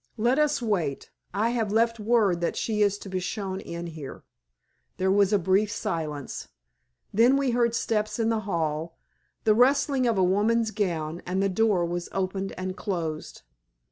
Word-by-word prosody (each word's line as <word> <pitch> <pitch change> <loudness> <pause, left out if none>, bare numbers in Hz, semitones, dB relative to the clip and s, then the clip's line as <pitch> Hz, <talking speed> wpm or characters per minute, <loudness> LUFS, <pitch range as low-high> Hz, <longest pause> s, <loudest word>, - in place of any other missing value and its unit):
Let 240 +6 +2
us 300 -4 +2
wait, 175 -11 -1 0.2
I 215 +5 +1
have 225 -4 -1
left 230 +1 +2
word 210 -5 +2
that 170 - 0
she 215 -2 -1
is 205 -1 +3
to 205 - -10
be 190 -1 -2
shown 190 +1 -3
in 170 -1 -6
here." 155 -5 -8 0.7
There 190 +1 +1
was 200 0 +4
a 205 - +5
brief 190 +3 +2
silence. 150 -7 -4 0.7
Then 240 +6 +5
we 275 -2 +1
heard 235 -1 +2
steps 215 -1 -1
in 225 -1 +1
the 225 -1 +1
hall, 160 -1 -2 0.5
the 215 - +5
rustling 260 +2 +3
of 230 -3 +1
a 190 - +4
woman's 215 +5 +2
gown, 170 -6 -2
and 185 +2 -1
the 195 - +2
door 195 -2 +2
was 175 0 -4
opened 190 0 -2
and 185 0 -4
closed. 170 -7 -4
200 Hz, 175 wpm, -26 LUFS, 175-225 Hz, 0.7 s, a